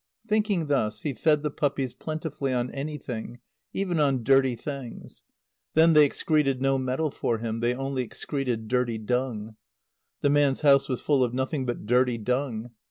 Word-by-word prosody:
Thinking 210 -5 +1
thus, 110 -7 0
he 145 - -1
fed 150 +2 +2
the 150 - -1
puppies 135 -3 -1
plentifully 155 -3 -4
on 125 0 -1
anything, 135 -5 -5 0.3
even 180 -4 -1
on 135 -5 +2
dirty 135 0 +4
things. 135 0 -8 0.5
Then 165 +1 +6
they 150 -1 +8
excreted 140 -3 +1
no 135 0 +2
metal 130 +4 -1
for 115 - -1
him. 115 0 -3
They 120 +1 +1
only 135 0 -2
excreted 125 -2 -3
dirty 125 -1 0
dung. 110 -1 -2 0.6
The 145 - +3
man's 145 -2 +3
house 140 -2 +5
was 130 - -2
full 140 -3 +2
of 125 0 -1
nothing 130 +1 -1
but 120 -3 -3
dirty 125 +1 +2
dung. 120 0 -2
135 Hz, 165 wpm, -26 LUFS, 120-145 Hz, 0.6 s, they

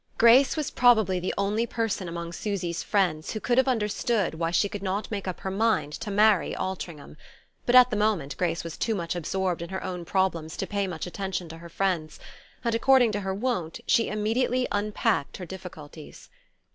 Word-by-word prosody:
Grace 250 +6 +6
was 305 - -2
probably 220 -7 +4
the 180 - -2
only 210 +4 0
person 225 -7 -2
among 170 0 -5
Susy's 180 -4 -3
friends 175 -7 0
who 215 - -3
could 240 +3 +2
have 265 - +3
understood 220 -4 0
why 165 +1 -1
she 180 +4 +2
could 200 0 -6
not 195 +3 -3
make 200 -3 -4
up 185 - -4
her 190 - -3
mind 195 -8 +1
to 210 - -5
marry 205 -2 +3
Altringham; 170 -6 -6 0.5
but 245 - +3
at 250 0 +8
the - - 0
moment 205 -10 0
Grace 170 -2 -1
was 165 -1 -7
too 225 - 0
much 170 -2 -3
absorbed 180 +1 -2
in 170 - -6
her 190 0 -4
own 180 -2 -4
problems 170 -3 -1
to - - -2
pay 200 -1 -1
much 175 -4 -5
attention 190 -1 -4
to 165 - -9
her 170 0 -11
friend's, 170 -4 -2 0.4
and, 235 -1 0
according 245 0 +4
to 205 - -2
her 195 -1 -3
wont, 205 -7 -2
she 230 - +3
immediately 240 +4 0
"unpacked" 205 - 0
her 185 - -7
difficulties. 170 -4 -11
195 Hz, 195 wpm, -26 LUFS, 170-220 Hz, 0.5 s, at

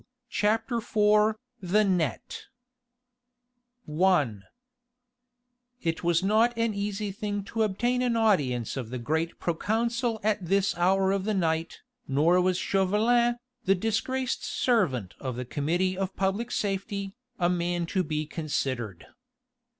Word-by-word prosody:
CHAPTER 225 +3 +1
IV 210 -1 +3 0.3
THE 195 +4 +3
NET 180 - -1 1.4
I 160 -2 +3 1.5
It 165 -1 -1
was 170 +1 +2
not 225 +4 +3
an 230 -1 +1
easy 205 0 -3
thing 205 0 -3
to 220 +3 -3
obtain 240 +4 +1
an 245 -2 +1
audience 140 - +1
of 125 -4 -4
the 125 - -4
great 160 +7 -2
proconsul 230 +6 -1
at 210 -2 +1
this 195 +3 +1
hour 190 +2 +3
of 195 -1 -1
the 215 -1 0
night, 165 -2 -1 0.3
nor 160 +6 +3
was 180 0 +1
Chauvelin, 225 +6 +2 0.3
the 195 0 +4
disgraced 225 +6 -1
servant 145 - 0
of 130 -3 -4
the 125 +1 -4
Committee 175 +8 0
of 190 0 -3
Public 195 +5 -1
Safety, 200 -2 -2 0.2
a 175 - +2
man 175 -1 0
to 185 +2 0
be 155 -2 -2
considered. 130 - -3
195 Hz, 125 wpm, -27 LUFS, 165-215 Hz, 1.5 s, the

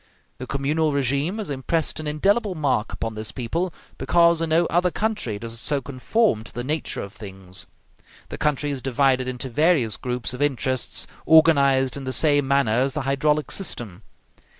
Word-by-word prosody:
The 130 - -6
communal 150 +3 0
regime 140 - 0
has 210 -8 -4
impressed 145 +5 -1
an 155 - -5
indelible 195 +7 +1
mark 135 -8 0
upon 115 -1 -4
this 110 0 -5
people, 165 +9 -2 0.3
because 170 -1 +3
in 165 - -1
no 165 +2 +3
other 175 +2 +2
country 210 - -2
does 115 +2 -7
it - - -7
so 145 +4 0
conform 135 - 0
to 115 - -8
the 120 - -3
nature 155 +5 -2
of 100 - -9
things. 95 -3 -6 0.6
The - - -6
country 145 -1 0
is 135 -2 -4
divided 130 0 +2
into 130 +1 -4
various 130 - +2
groups 125 0 -3
of 125 - -6
interests 130 -3 0 0.2
organized 140 -5 +5
in 135 - -7
the 130 - -2
same 145 +1 +3
manner 135 -5 +2
as 135 0 0
the 150 - -2
hydraulic 145 +3 0
system. 115 - -4
140 Hz, 175 wpm, -23 LUFS, 125-160 Hz, 0.6 s, organized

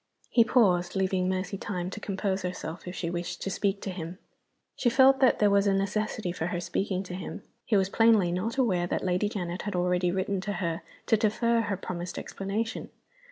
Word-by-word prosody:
He 235 - +6
paused 185 -8 +3
leaving 190 -1 +1
Mercy 190 +1 -2
time 180 -2 -3
to 210 - -6
compose 195 -1 -2
herself, 180 -2 -5
if 180 - -5
she 170 -2 -3
wished 175 +1 -4
to 195 - -2
speak 200 0 -1
to 195 - -3
him. 175 -1 -6 0.6
She 240 - +2
felt 265 +1 +6
that 260 -2 +5
there 210 -1 +4
was 200 0 +4
a 195 - +3
necessity 205 0 -1
for 170 -1 -3
her 175 0 -2
speaking 190 +1 -2
to 180 - -8
him. 180 -1 -6 0.2
He 215 - +3
was 190 -1 +2
plainly 220 -5 +4
not 215 +8 -2
aware 185 -9 +2
that - - -2
Lady 185 +2 +1
Janet 180 -4 -4
had 205 -2 -4
already 180 0 +1
written 190 +1 -1
to 205 +1 -3
her 170 -3 -2 0.2
to 225 - +4
defer 230 +2 +2
her 205 -3 -2
promised 180 -1 -5
explanation. 210 +4 -3
190 Hz, 205 wpm, -28 LUFS, 180-210 Hz, 0.6 s, He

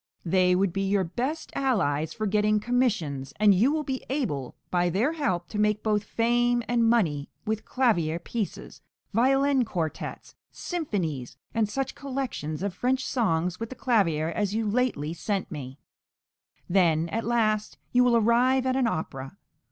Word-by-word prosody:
They 180 +1 +3
would 190 -1 +1
be 195 - -1
your 195 0 +2
best 255 - -3
allies 160 - 0
for 215 - -3
getting 210 +1 +2
commissions; 200 - 0
and 210 -1 +6
you 225 +9 +3
will 310 0 0
be 265 -2 -4
able, 190 - -2 0.2
by 175 -1 +2
their 220 - +1
help, 185 - -1
to 210 - -4
make 210 0 +1
both 210 -1 +1
fame 240 +2 +1
and 235 -1 +3
money 160 -12 +1 0.2
with 220 0 -2
clavier 175 -12 +1
pieces, 205 +4 -5 0.3
violin 270 +3 +3
quartets, 170 -8 -4 0.2
symphonies, 175 - -3 0.2
and 225 -2 +1
such 270 +4 -2
collections 255 - -4
of 200 -2 -1
French 255 +7 0
songs 180 -7 0
with 230 0 -4
the 260 - -8
clavier 170 - +1
as 205 +3 -1
you 225 -1 0
lately 205 - 0
sent 195 +3 -3
me; 135 -4 -7 0.9
then, 170 -3 +3
at 225 +6 -2
last, 215 -2 0
you 250 0 +5
will 240 -1 +4
arrive 245 +4 +3
at 260 0 +1
an 260 -3 +2
opera. 135 -5 -4
210 Hz, 160 wpm, -27 LUFS, 175-245 Hz, 0.9 s, and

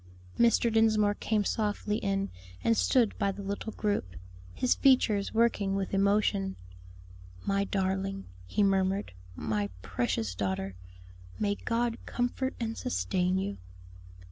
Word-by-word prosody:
Mr. 235 -1 +4
Dinsmore 215 -2 +4
came 210 0 0
softly 210 -1 0
in 195 -1 -1 0.3
and 230 - +3
stood 235 -1 +3
by 200 - +2
the 200 +1 -8
little 200 +3 -4
group, 205 - -2 0.4
his 250 - +2
features 220 -7 +3
working 220 -4 +2
with 195 -1 -2
emotion. 200 -1 +2 0.9
"My 200 0 +1
darling," 195 0 -1 0.2
he 205 - +1
murmured, 195 - +1 0.2
"my 105 0 -1
precious 110 -1 -1
daughter, 95 0 -2 0.6
may 205 -1 +1
God 230 +2 -1
comfort 250 +2 -1
and 225 -1 -2
sustain 180 - 0
you." 100 - -3
200 Hz, 120 wpm, -30 LUFS, 190-220 Hz, 0.9 s, Mr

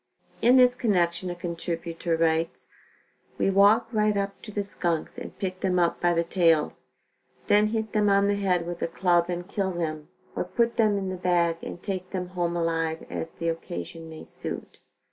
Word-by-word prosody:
In 245 +3 +6
this 250 -1 +6
connection 185 -7 +1
a 175 - -4
contributor 170 -1 -3
writes: 165 0 0 0.7
"We 195 - +2
walk 200 +4 +5
right 210 -2 +2
up 200 0 -3
to 215 - -9
the 205 0 -1
skunks 170 -5 -2
and - - -9
pick 185 -1 -3
them 185 -2 +1
up 170 -1 +1
by 175 0 +3
the 170 - +2
tails; 165 -3 +2 0.6
then 210 +1 +4
hit 220 0 -2
them 210 -1 +3
on 200 0 +4
the 205 - +2
head 185 -4 +1
with 175 0 -5
a - - +1
club 175 0 +2
and 175 0 -3
kill 195 -1 -1
them 155 -3 -3 0.3
or - - 0
put 235 0 0
them 215 -3 +3
in 190 -1 -2
the 185 - -4
bag 175 -2 +2
and 175 - -8
take 185 -3 -4
them 180 -2 -4
home 175 -1 -1
alive, 165 -1 -1
as 165 - -3
the 170 - -2
occasion 165 - -6
may 160 -1 -9
suit." - - -7
180 Hz, 190 wpm, -26 LUFS, 170-200 Hz, 0.7 s, In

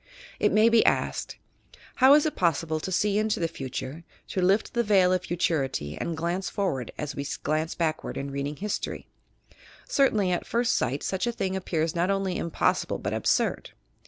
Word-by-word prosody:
It - - +3
may 215 +1 +5
be 230 -1 +5
asked: - - 0 0.6
"How 265 +2 +7
is 300 - +4
it 310 - -1
pos 170 -3 +1
sible 155 -1 -2
to 190 - -4
see 205 +3 +2
into 215 0 0
the 165 - +1
future, 135 +1 -6 0.3
to 185 - -1
lift 195 +4 +2
the 235 - +2
veil 195 -5 +4
of 185 - +1
futurity 135 - -1
and 165 -1 -4
glance 175 +3 -2
forward 135 - -2
as 150 0 -4
we 140 - -3 0.2
glance 155 +1 -1
backward 160 -2 -2
in 140 0 -4
reading 140 +2 -3
historyl" 210 +6 -4 0.8
Certainly, 215 -9 +2
at 175 - -2
first 235 +1 +1
sight 130 +3 -1
such 190 +4 -1
a - - +1
thing 190 -4 -2
ap 190 - -4
pears 160 -1 0
not 175 +2 0
only 195 -2 0
impossible 170 - 0
but - - -3
absurd. - - 0
180 Hz, 190 wpm, -27 LUFS, 155-205 Hz, 0.8 s, How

